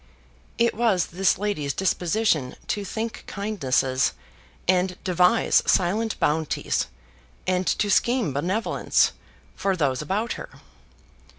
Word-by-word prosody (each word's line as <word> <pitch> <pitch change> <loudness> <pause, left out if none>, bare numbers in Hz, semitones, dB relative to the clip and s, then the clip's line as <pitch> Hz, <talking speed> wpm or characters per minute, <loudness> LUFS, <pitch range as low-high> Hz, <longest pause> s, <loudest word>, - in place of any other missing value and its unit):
It 235 0 +3
was 210 -7 +2
this 190 0 +2
lady's 180 -9 -2
disposition 180 - +1
to 205 - -1
think 220 +3 -4
kindnesses, 135 -11 0 0.5
and 180 0 +2
devise 180 +4 +3
silent 215 +5 +1
bounties 155 0 0 0.6
and 185 0 0
to 210 - +1
scheme 240 - +2
benevolence, 185 - +1 0.4
for 195 -1 0
those 140 -6 0
about 205 +9 -1
her. - - -8
185 Hz, 105 wpm, -24 LUFS, 160-215 Hz, 0.6 s, It